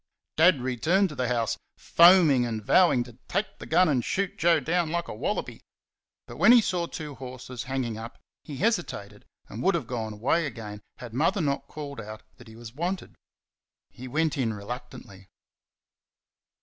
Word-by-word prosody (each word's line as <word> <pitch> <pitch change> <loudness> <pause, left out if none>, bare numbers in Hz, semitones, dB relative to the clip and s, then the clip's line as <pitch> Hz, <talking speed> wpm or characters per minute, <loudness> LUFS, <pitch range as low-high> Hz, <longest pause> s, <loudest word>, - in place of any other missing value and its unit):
Dad 160 -4 +5
returned 155 - +1
to 150 - -8
the 125 -1 -1
house, 120 -2 -1 0.2
foaming 170 -7 +6
and 110 -3 -4
vowing 165 -7 +4
to 120 -1 -15
take 205 +2 -2
the - - -9
gun 185 - +4
and 130 -6 +1
shoot 195 -1 -2
Joe 165 0 +3
down 165 +3 0
like 170 +1 -2
a - - -6
wallaby. 105 - -3 0.6
But 120 - -11
when 215 - +6
he 245 - +8
saw 180 -5 -1
two 150 -3 -7
horses 125 -2 -8
hanging 120 -5 -2
up 115 +1 -9 0.3
he 145 -3 -8
hesitated 170 - -2 0.2
and - - -7
would - - +2
have - - -2
gone 110 -3 -4
away 135 +10 +1
again 110 -5 -8 0.2
had 120 -3 -10
Mother 165 - +1
not 140 -5 -1
called 140 -4 -7
out 110 0 -9
that 120 - -15
he 110 - -13
was 115 0 -11
wanted. 175 +6 -4 0.8
He 130 - -10
went 155 +2 0
in 115 -4 0
reluctantly. 100 -3 -9
130 Hz, 175 wpm, -27 LUFS, 115-170 Hz, 0.8 s, he